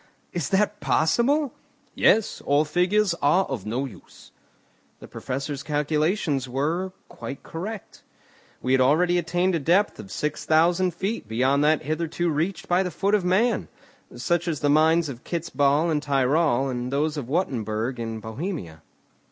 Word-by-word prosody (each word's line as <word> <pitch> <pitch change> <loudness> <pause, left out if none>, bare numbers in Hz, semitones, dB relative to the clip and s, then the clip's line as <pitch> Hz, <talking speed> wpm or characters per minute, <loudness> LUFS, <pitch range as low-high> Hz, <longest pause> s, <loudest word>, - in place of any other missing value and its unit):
"Is 175 -4 -2
that 210 +1 +1
possible?" 250 - +2 0.4
"Yes, 220 -1 +2
or 145 +2 +3
figures 180 +5 +2
are 180 +7 +3
of 110 -7 -5
no 125 +5 -1
use." 110 -9 -14 0.7
The - - -11
Professor's 140 +2 -4
calculations 150 -1 0
were 160 +9 -1 0.2
quite 140 - -8
correct. 195 +5 -7 0.6
We 125 - 0
had 130 0 +4
already 175 +7 +3
attained 175 +2 0
a 165 - +1
depth 180 +8 +2
of 100 -2 -9
six 150 0 -3
thousand 170 +3 +2
feet 195 - -3
beyond 130 +6 +2
that 155 0 +3
hitherto 165 +3 -1
reached 160 +4 -2
by 175 +1 +3
the 185 - -1
foot 195 +5 -1
of 210 -3 +3
man, 195 +7 +1 0.5
such 175 0 -1
as 160 -4 -2
the 145 - +2
mines 160 +2 +4
of 125 -4 -8
Kitz 170 -1 -4
Bahl 145 +4 +2
in 150 - +1
Tyrol, 140 -1 +2
and 125 -1 -3
those 150 +2 0
of 140 -6 -5
Wuttembourg 120 - -1
in 115 -1 -4
Bohemia. 110 - -6
155 Hz, 155 wpm, -24 LUFS, 135-180 Hz, 0.7 s, had